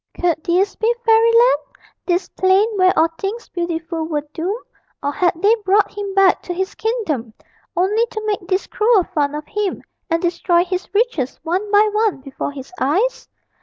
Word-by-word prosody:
Could 340 -2 0
this 375 +4 +1
be 445 +1 +2
Fairyland, 460 +2 +5 0.5
this 355 +1 +1
plain 380 +3 +3
where 370 -1 +4
all 325 +1 +4
things 425 +4 -4
beautiful 335 -1 -3
were 300 -2 -3
doomed 380 +8 -3 0.4
or 285 - 0
had 355 +4 +2
they 420 +2 +6
brought 400 +2 +3
him 400 -1 -5
back 390 -1 +4
to 355 - -5
his 380 +2 -2
kingdom 315 - -3 0.4
only 420 +6 +2
to 435 -1 -6
make 410 -4 -2
this 375 0 0
cruel 435 -3 +3
fun 290 -3 -1
of 300 0 -5
him, 415 +1 -3 0.3
and 330 0 +1
destroy 345 0 +1
his 365 0 -3
riches 400 - 0
one 370 +5 -2
by 420 +1 +5
one 430 -6 +1
before 275 +1 -5
his 275 +4 -10
eyes? 375 - 0
375 Hz, 170 wpm, -19 LUFS, 335-425 Hz, 0.5 s, they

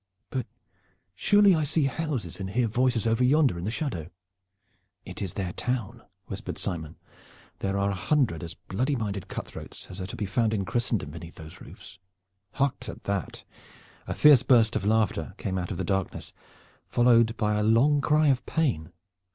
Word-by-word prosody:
But 130 - -2 0.7
surely 205 - +5
I 155 -2 +1
see 150 +1 +1
houses 135 - -2
and 95 -1 -4
hear 120 +4 +1
voices 120 +1 +1
over 115 +2 +2
yonder 135 - +3
in 85 - -5
the - - -1
shadow?" 110 - -3 1.0
"It 90 +2 -8
is 95 -4 -4
their 90 -3 -3
town," 125 -5 -3 0.2
whispered - - -6
Simon. 80 -5 -4 0.6
"There 100 0 -1
are 100 0 +1
a - - -1
hundred 110 - 0
as 85 -2 -7
bloody 130 - -2
minded 100 -5 -3
cutthroats - - -8
as 95 +1 -7
are 95 - -4
to - - -7
be 105 - -3
found 110 +3 +1
in 100 -2 -1
Christendom 115 -10 -1
beneath 85 +2 -10
those 80 0 -11
roofs. 100 - -12 0.5
Hark 140 -1 0
to 120 -4 -6
that!" 100 -3 -3 0.6
A - - -3
fierce 150 -5 +7
burst 120 -4 +4
of - - -1
laughter 105 -5 +1
came 95 -3 -2
out 90 - -4
of 95 - -4
the - - -2
darkness, 95 -2 -2 0.5
followed 115 -1 +4
by 105 -1 +1
a 105 - +1
long 120 +7 +4
cry 150 +1 +3
of 130 -2 +2
pain. 125 - 0
110 Hz, 175 wpm, -27 LUFS, 95-130 Hz, 1.0 s, fierce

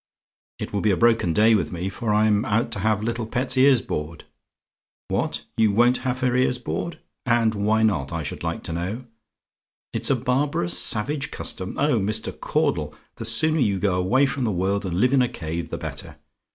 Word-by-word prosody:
It - - -6
will 100 - 0
be 110 - +2
a 95 - +2
broken 115 -7 +3
day 110 +5 +4
with 105 - +1
me, 90 +1 -4
for 105 +3 -3
I'm 105 0 +3
going - - -4
out 115 +2 +1
to 105 - -3
have 105 +1 0
little 115 0 -2
pet's 125 +3 -1
ears 130 -4 +5
bored 75 +2 -5 0.9
What? - - -2
"YOU 110 -2 +4
WON'T 120 +4 +4
HAVE 130 0 -3
HER 125 -1 +1
EARS 125 -1 +2
BORED? 155 +6 -4 0.3
"And 115 -2 +3
why 110 +2 +1
not, 75 -12 +1
I 85 -1 -3
should 70 - -6
like - - -3
to 80 - -4
know? 95 +9 -4 0.9
"IT'S - - +1
A 135 - +4
BARBAROUS, 125 -7 0
SAVAGE 140 +7 +1
CUSTOM? 95 0 -4
"Oh, 145 -5 +2
Mr. 105 +2 -1
Caudle! 85 - -1 0.2
the 115 - -6
sooner 155 +9 +2
you 105 -7 +2
go 95 0 0
away 105 +10 +3
from 135 -1 -2
the 110 - 0
world, 95 +2 -1
and 90 0 -2
live 125 +4 +3
in 135 - +5
a 125 - +1
cave, 85 -7 -5
the - - -4
better. - - -7
110 Hz, 205 wpm, -23 LUFS, 95-125 Hz, 0.9 s, ears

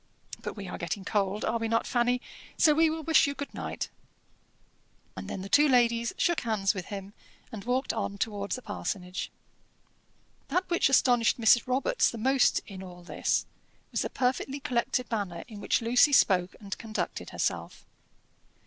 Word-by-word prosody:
But - - -5
we 200 -3 -7
are - - -6
getting 180 +3 -4
cold 200 0 0
are 230 - 0
we 225 - -1
not, 230 +1 +1
Fanny? 245 0 +1 0.4
so 305 - +6
we 320 +1 +4
will 320 0 -4
wish 320 0 +4
you 280 - -3
good 280 +1 -6
night." - - -4 1.3
And - - -7
then 190 - -5
the - - -6
two 295 +9 +5
ladies 235 -2 +3
shook 345 -1 +2
hands 215 -4 0
with 185 -3 -6
him, 200 0 -7 0.4
and 210 -3 -7
walked 255 +2 0
on 200 -2 -3
towards 205 -1 -2
the 255 - -9
parsonage. 185 -3 -4 1.2
That 370 +1 0
which 340 - +3
astonished 245 -4 +4
Mrs. 235 +2 +5
Robarts 275 - +2
the 235 - -6
most 260 +3 +3
in 190 -2 -9
all 180 -1 -10
this 175 - 0 0.5
was - - 0
the - - -2
perfectly 265 +2 -1
collected 250 -1 0
manner 195 -7 -3
in 215 -3 -10
which 230 - +1
Lucy 245 +5 +4
spoke 185 -8 +4
and 200 -2 -5
conducted 220 -1 -4
herself. - - -3
230 Hz, 170 wpm, -28 LUFS, 200-260 Hz, 1.3 s, so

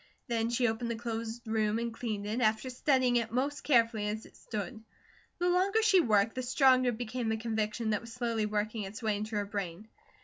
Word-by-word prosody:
Then 230 -2 0
she 240 +1 +2
opened 225 +1 -2
the 235 - -1
closed 230 0 -5
room 220 -1 +1
and 235 0 -2
cleaned 215 -4 -4
it, 220 +4 -2
after 220 +3 +1
studying 255 -1 +2
it 230 -2 -1
most 275 +4 -1
carefully 230 -6 +3
as 215 +1 -3
it - - -17
stood. 220 +1 -6 0.5
The 355 - 0
longer 385 +5 +3
she 410 -4 +6
worked, 215 -4 +3
the 255 - -3
stronger 255 0 +4
became 240 0 -3
a 220 - 0
conviction 220 0 -1
that 210 - 0
was 230 0 -10
slowly 230 -3 -1
working 215 +1 -2
its 205 +4 -7
way 215 -2 +1
into 215 +1 -4
her 205 -1 0
brain. 200 0 -5
230 Hz, 205 wpm, -31 LUFS, 215-245 Hz, 0.5 s, she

